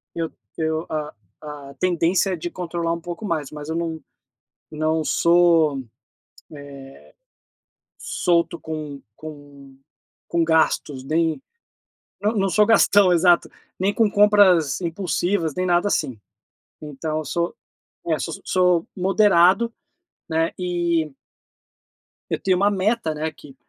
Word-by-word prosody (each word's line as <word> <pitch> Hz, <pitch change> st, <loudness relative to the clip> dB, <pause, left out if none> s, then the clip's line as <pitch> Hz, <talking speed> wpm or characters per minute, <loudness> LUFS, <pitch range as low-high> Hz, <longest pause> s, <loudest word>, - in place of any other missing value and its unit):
eu 165 Hz, -1 st, -3 dB, 0.3 s
eu 160 Hz, 0 st, -1 dB
a 150 Hz, -1 st, -4 dB, 0.3 s
a 145 Hz, -2 st, -9 dB
tendência 180 Hz, +2 st, +1 dB
é -, -, 0 dB
de 175 Hz, +1 st, -5 dB
controlar 170 Hz, -1 st, -3 dB
um 170 Hz, -, -4 dB
pouco 175 Hz, +5 st, -7 dB
mais. 155 Hz, -7 st, -2 dB
Mas 150 Hz, 0 st, -8 dB
eu 160 Hz, -, -2 dB
não 165 Hz, -1 st, -3 dB, 0.7 s
não 155 Hz, +1 st, 0 dB
sou, 170 Hz, -4 st, +3 dB
eh, -, -, -7 dB, 2.1 s
solto 170 Hz, -1 st, 0 dB
com 155 Hz, -3 st, -6 dB, 0.2 s
com 145 Hz, -3 st, -12 dB, 0.5 s
com 170 Hz, -1 st, +1 dB
gastos, 160 Hz, -4 st, +1 dB
nem 160 Hz, -, 0 dB, 0.8 s
não 210 Hz, +1 st, +1 dB
não 195 Hz, -1 st, +1 dB
sou 210 Hz, +4 st, +4 dB
gastão, 205 Hz, -4 st, +5 dB
exato, 175 Hz, 0 st, +4 dB, 0.3 s
nem 195 Hz, +2 st, 0 dB
com 220 Hz, -3 st, +2 dB
compras 200 Hz, -7 st, +4 dB
impulsivas 175 Hz, -1 st, -1 dB
nem 185 Hz, -, -1 dB
nada, 175 Hz, +2 st, +2 dB
assim. 125 Hz, -, -1 dB, 0.6 s
Então 155 Hz, +1 st, -4 dB
eu 155 Hz, -, -6 dB
sou, 170 Hz, +4 st, -2 dB, 0.5 s
é, -, -, +1 dB
so -, -, -4 dB
so -, -, -9 dB
sou 180 Hz, -2 st, +2 dB
moderado, 190 Hz, +3 st, +3 dB, 0.6 s
né, 165 Hz, 0 st, 0 dB
e 170 Hz, -4 st, -1 dB, 1.2 s
eu -, -, -2 dB
tenho 185 Hz, -1 st, +2 dB
uma 200 Hz, +2 st, +3 dB
meta 200 Hz, -3 st, 0 dB
né 155 Hz, +1 st, -3 dB
que 145 Hz, -3 st, -15 dB
170 Hz, 130 wpm, -22 LUFS, 155-185 Hz, 2.1 s, gastão